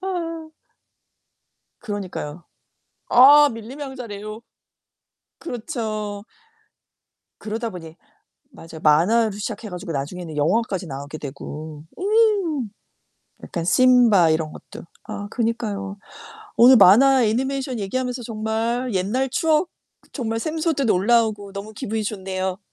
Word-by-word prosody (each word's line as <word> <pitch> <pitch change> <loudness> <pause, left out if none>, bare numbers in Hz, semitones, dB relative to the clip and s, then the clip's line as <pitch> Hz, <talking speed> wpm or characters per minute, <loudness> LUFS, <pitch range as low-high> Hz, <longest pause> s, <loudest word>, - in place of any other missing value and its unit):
아. 330 -4 -4 1.3
그러니까요. 185 -7 -6 0.7
아 290 +4 +8
밀림의 235 +6 -8
왕자 265 -3 -8
레오. 215 +1 -8 1.0
그렇죠. 215 -6 -5 1.2
그러다 225 +2 -4
보니 165 -3 -10 0.6
맞아요. 165 -1 -11
만화로 205 +9 +4
시작해 210 +2 -6
가지고 180 -1 -6
나중에는 160 +3 -5
영화까지 190 +3 0
나오게 140 +2 -7
되고. 150 +2 -8 0.2
음. 395 - +2 0.7
약간 170 - -4
심바 225 -4 +5
이런 155 -1 -1
것도. - - -12 0.2
아 205 - -6
그니까요. 215 -4 -3 0.6
오늘 250 +2 +8
만화 245 +7 +6
애니메이션 260 +3 -1
얘기하면서 250 +5 -3
정말 225 +2 -2
옛날 210 +9 0
추억 320 +5 +1 0.4
정말 225 -4 -3
샘솟듯 310 -1 -1
올라오고 210 0 +2
너무 200 +2 -7
기분이 215 +1 -3
좋네요. 190 -2 -3
220 Hz, 260 characters per minute, -22 LUFS, 190-255 Hz, 1.3 s, 아